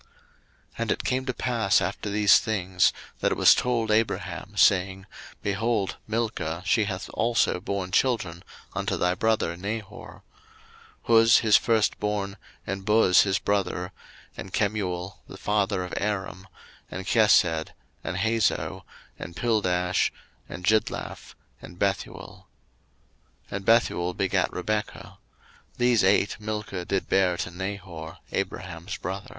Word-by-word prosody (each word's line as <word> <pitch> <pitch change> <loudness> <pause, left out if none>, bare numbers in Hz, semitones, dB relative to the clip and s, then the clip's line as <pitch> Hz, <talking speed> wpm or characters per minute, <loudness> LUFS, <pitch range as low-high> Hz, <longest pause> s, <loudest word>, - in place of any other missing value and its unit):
01:022:020 - - -30 0.7
And - - 0
it - - -1
came 130 0 -1
to 125 - 0
pass 115 -6 +2
after 95 +4 -3
these 105 0 +5
things, 95 -5 +1 0.3
that - - +1
it - - -1
was - - +7
told 115 -3 0
Abraham, 110 +1 -1
saying, 95 0 +3 0.4
Behold, 100 0 -1
Milcah, 105 -7 -2
she 110 +3 +3
hath 100 +1 -4
also 115 -6 +1
born 95 0 -4
children 95 -11 0 0.3
unto - - -2
thy 90 0 +1
brother 110 -4 0
Nahor; 100 +3 -7 0.8
01:022:021 115 -1 +6
Huz 115 0 +6
his 110 -3 +4
firstborn, 105 -3 +1 0.3
and 95 +1 -4
Buz 105 -3 +5
his 95 -1 +1
brother, 100 -3 -1 0.4
and 95 - -8
Kemuel 95 -3 -2
the 95 - -10
father 100 -2 0
of 90 - -7
Aram, 95 -2 -3 0.4
01:022:022 - - -5
And 95 - -6
Chesed, 90 -8 +4 0.4
and - - -3
Hazo, 110 +2 0 0.4
and 85 - -8
Pildash, 90 -6 +1 0.4
and 90 - -7
Jidlaph, 110 +1 -1 0.3
and 85 - -11
Bethuel. 100 0 -3 1.0
01:022:023 - - -3
And 100 -1 -5
Bethuel 95 -6 +2
begat 95 -1 0
Rebekah: 105 +3 -4 0.6
these 120 -2 +3
eight 95 +1 +3
Milcah 105 -4 -4
did 95 0 -1
bear 95 -2 +2
to 90 - -4
Nahor, 90 -3 -6
Abraham's 90 0 -4
brother. 95 +2 -5
100 Hz, 135 wpm, -26 LUFS, 90-110 Hz, 1.0 s, was